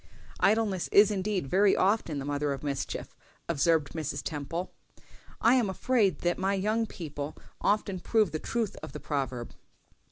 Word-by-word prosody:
"Idleness 205 -3 +2
is 205 +1 +7
indeed 195 -3 -1
very 195 +8 +4
often 190 -6 +1
the 135 - -4
mother 145 0 -1
of 135 - -7
mischief," 140 -2 -4 0.3
observed 160 -1 +2
Mrs. 145 -3 -4
Temple. 165 +4 -4 0.7
"I 230 - +5
am 245 -6 +3
afraid 200 - +1
that 175 0 0
my 195 +1 +1
young 215 +4 0
people 150 -5 -6 0.2
often 200 -2 +1
prove 215 0 +2
the 155 - -2
truth 230 +1 -2
of - - -8
the 150 - -6
proverb." 130 -6 -3
180 Hz, 155 wpm, -29 LUFS, 145-205 Hz, 0.7 s, is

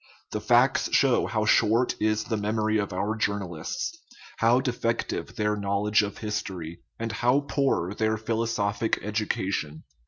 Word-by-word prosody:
The - - -3
facts - - +3
show - - +4
how 110 -1 0
short 115 +3 +3
is 110 0 +1
the 110 - -2
memory 110 +1 0
of 100 -1 -2
our 100 +4 -1
journalists, 100 - -3 0.4
how 115 +2 +4
defective 120 -3 -2
their 105 -2 0
knowledge 100 +1 +1
of 105 -1 -4
history, 95 -6 -4 0.2
and 115 0 -3
how 125 +4 +2
poor 135 -10 0
their 110 +1 0
philosophic 110 -1 -1
education. 95 -7 -2
110 Hz, 135 wpm, -26 LUFS, 100-115 Hz, 0.4 s, show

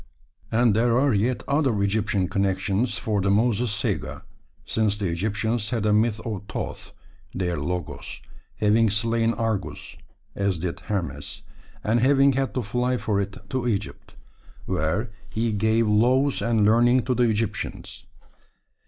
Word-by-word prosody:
And 115 -2 +3
there 115 +1 +3
are 140 -1 +3
yet 115 +4 0
other 135 -8 +1
Egyptian 100 -1 +1
connections 100 +4 0
for 105 -3 -1
the 100 - +1
Moses 115 +3 +2
saga, 100 - -2 0.4
since 105 -2 0
the 105 - -2
Egyptians 105 +5 -1
had 115 -3 -1
a 105 - +3
myth 110 +1 +2
of 110 -5 -3
Thoth - - -5 0.4
(their 90 -2 -1
Logos) 85 +2 -4 0.4
having 110 +1 +3
slain 115 +2 +1
Argus 110 -3 -3 0.4
(as 100 -3 0
did 85 +1 -4
Hermes), 95 +2 -4 0.4
and 115 +2 +2
having 135 +2 +4
had 135 +1 -1
to 125 - 0
fly 125 +4 0
for 105 -4 0
it 100 0 -5
to 130 -2 -1
Egypt, 105 -3 -3 0.5
where 105 +9 -1 0.2
he 115 +1 -1
gave 110 +2 +2
laws 125 +6 +3
and 115 -3 +2
learning 120 +3 +4
to 125 - 0
the 120 -1 +2
Egyptians. 110 0 -3
110 Hz, 145 wpm, -24 LUFS, 100-120 Hz, 0.5 s, having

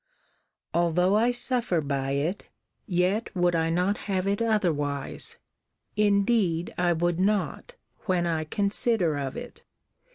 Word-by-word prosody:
Although 175 +3 +2
I 230 +3 +3
suffer 245 -6 +2
by 140 -2 -2
it, 155 +8 -2 0.4
yet 185 +4 0
would 175 -1 +2
I 165 0 +1
not 180 +5 +1
have 190 -1 0
it 200 +2 0
otherwise: 155 -11 -1 0.6
indeed 200 -4 +2
I 175 -1 +1
would 175 +1 0
not, 210 - -1 0.3
when 180 -2 +1
I 160 -2 -1
consider 200 -1 +1
of 135 -2 -4
it. 245 0 -9
180 Hz, 125 wpm, -26 LUFS, 165-210 Hz, 0.6 s, I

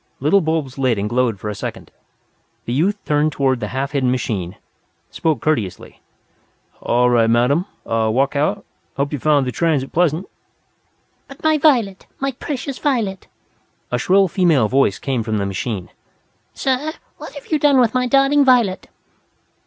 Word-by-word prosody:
Little 155 +9 +3
bulbs 155 -5 -2
lit 130 -4 +1
and 100 +1 -2
glowed 120 -3 0
for 105 - -6
a 105 - -2
second. - - -7 0.7
The 120 - -3
youth 185 +10 +1
turned 150 +1 +1
toward 135 -3 0
the - - -3
half 135 +2 -3
hidden 135 -3 +1
machine, 105 -8 -2 0.6
spoke 160 -2 -1
courteously. 115 - -2 0.8
"All 125 +1 +2
right, 115 -2 +3
madam. 125 - +2 0.2
Walk 115 +5 0
out. 195 +8 0 0.3
Hope 140 +2 -1
you 145 - -2
found 145 0 +2
the 125 - -2
transit 150 -3 0
pleasant." 170 +1 +1 1.0
"But 275 - -14
my 315 -1 +3
Violet! 235 -11 +2
My 275 0 -1
precious 270 +1 -5
Violet!" 225 -10 -1 0.6
a 125 - 0
shrill 195 +7 +3
female 170 - +2
voice 130 -5 +2
came 130 -4 -2
from 110 -1 -2
the 100 - -1
machine. 100 0 -4 0.7
"Sir, 275 +4 -1 0.2
what - - -10
have 285 +2 -11
you 310 - +2
done 285 -2 +4
with 235 -3 +3
my 250 0 +1
darling 275 +3 +4
Violet?" 240 -8 +2
150 Hz, 160 wpm, -19 LUFS, -, 1.0 s, done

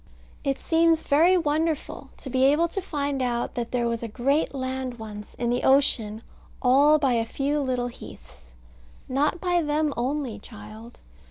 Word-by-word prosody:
It 275 -1 0
seems 330 0 +2
very 335 +6 +4
wonderful, 315 -1 -1
to 270 - -9
be 260 0 +2
able 300 +5 +4
to 390 - -3
find 285 -6 -2
out 240 -1 -1
that 235 -1 -3
there 240 -1 0
was 230 -1 -2
a 230 - -4
great 270 +7 0
land 260 -1 -3
once 210 -2 -9
in 240 0 -1
the 245 - 0
ocean 230 -5 +2 0.4
all 280 +4 +5
by 275 -4 +1
a 230 -1 +2
few 280 +5 -1
little 255 -3 -1
heaths. 65 - -14 0.6
Not 290 +6 0
by 355 -1 +1
them 300 -1 0
only, 255 -3 -2
child. 215 +2 -12
265 Hz, 165 wpm, -25 LUFS, 235-300 Hz, 0.6 s, all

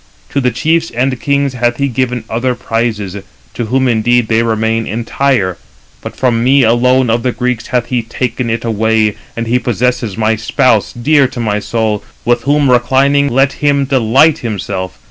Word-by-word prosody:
To 140 - 0
the 125 - +2
chiefs 160 +7 0
and 130 +1 -2
kings 140 -1 0
hath 120 -1 0
he 140 - 0
given 125 -2 -2
other 125 +3 -1
prizes; 115 -5 -2 0.4
to 120 - -3
whom 130 +3 +1
indeed 120 0 +1
they 115 0 +3
remain 115 0 0
entire: 115 -3 -1 0.4
but - - -8
from 120 -3 0
me 135 +2 +4
alone 125 +1 +3
of 115 +1 +1
the 125 - 0
Greeks 125 -1 -2
hath 125 -2 0
he 125 -2 0
taken 120 +1 -3
it 115 +1 -2
away, 110 -1 +1 0.2
and 115 - -2
he 120 +2 +1
possesses 120 -3 -1
my 110 0 +1
spouse, 110 0 +1
dear 140 +3 +2
to 125 - -8
my 105 -3 -1
soul, 110 -1 -2 0.2
with 120 0 +2
whom 145 -1 +2
reclining, 135 +3 +3
let 135 +2 +2
him 140 -1 +2
delight 135 +4 +3
himself. 95 -5 -4
120 Hz, 175 wpm, -13 LUFS, 115-130 Hz, 0.4 s, me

